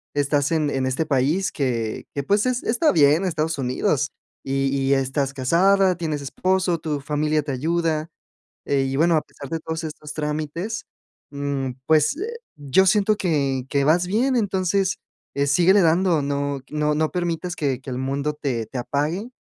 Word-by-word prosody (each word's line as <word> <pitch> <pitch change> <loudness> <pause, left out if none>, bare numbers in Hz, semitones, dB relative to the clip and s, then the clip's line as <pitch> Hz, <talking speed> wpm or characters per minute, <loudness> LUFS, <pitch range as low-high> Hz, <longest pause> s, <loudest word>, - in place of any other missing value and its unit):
estás 145 0 +1
en 155 -3 +1
en 130 -1 -1
este 140 +5 -1
país 150 +8 +1
que 115 -5 -2
que, 140 - -1
pues, 205 - +2
es 250 -1 -1
está 275 +8 +2
bien, 150 +3 +4
Estados 160 -3 -1
Unidos 135 +2 0 0.3
y 135 0 0
y 135 0 +2
estás 135 +1 -1
casada, 185 +7 +3
tienes 155 -4 -3
esposo, 185 +3 0
tu 155 -3 -3
familia 150 +1 0
te 145 - -4
ayuda, 160 +3 -1 0.6
eh, 140 -1 +1
y 135 0 -2
bueno, 165 +2 +4
a 155 - +3
pesar 140 - -11
de 165 - -2
todos 160 +1 -5
estos 150 -1 -7
trámites, 155 +8 -3 0.5
mm, 140 -2 -2 0.2
pues, 155 - +4
eh, 460 +6 -4 0.2
yo 145 +6 +2
siento 210 +2 +3
que 140 -9 0
que 140 0 +1
vas 170 +5 +3
bien, 250 +7 +1
entonces, 190 -3 +1 0.4
eh, 140 0 0
síguele 180 +7 +5
dando, 170 -1 +3
no 140 -1 -2
q - - -10
no 150 0 +2
no 155 0 +1
permitas 175 0 -2
que 135 -5 -1
que 130 - -9
el 125 - -3
mundo 140 +3 -2
te 120 -6 -2
te - - -7
apague, 150 - -2
150 Hz, 175 wpm, -23 LUFS, 140-175 Hz, 0.6 s, síguele